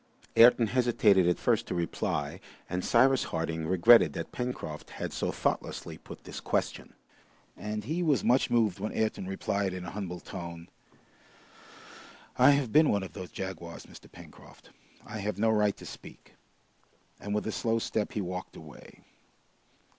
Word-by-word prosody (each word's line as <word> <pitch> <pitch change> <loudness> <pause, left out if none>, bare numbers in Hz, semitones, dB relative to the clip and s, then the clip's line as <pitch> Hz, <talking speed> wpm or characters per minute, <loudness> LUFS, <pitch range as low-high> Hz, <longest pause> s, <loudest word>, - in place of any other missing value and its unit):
Ayrton 120 0 +7
hesitated 110 -6 +3
at 90 - +1
first - - +1
to - - -3
reply, 85 -2 -2 0.3
and 90 0 -3
Cyrus 130 +2 +4
Harding 80 0 -3
regretted 95 +7 +6
that - - -5
Pencroft 125 -11 -5
had - - -6
so - - -1
thoughtlessly - - -3
put - - -12
this - - -7
question. - - -2 0.6
And 105 0 -5
he 160 - -2
was 155 -6 +2
much 125 +2 +3
moved 110 -6 +2
when 105 +2 -3
Ayrton 110 -4 -1
replied 95 0 -2
in 90 -1 -6
a 85 - -6
humble 95 -4 -5
tone, 85 -2 -8 1.7
"I 130 +3 +6
have 140 -5 +2
been 155 0 +6
one 100 -1 +1
of 95 - -8
those 90 -2 -7
jaguars, 85 -3 -7
Mr. - - -15
Pencroft. - - -15 0.3
I 110 - -6
have 105 -1 -3
no 110 +2 +2
right 105 -2 +2
to - - -11
speak." - - -12 0.9
And 105 +2 -3
with 105 - -1
a 110 - -2
slow 115 +1 0
step 110 -1 -2
he 105 - -1
walked 90 0 -6
away. 75 -3 -13
105 Hz, 160 wpm, -29 LUFS, 90-115 Hz, 1.7 s, Ayrton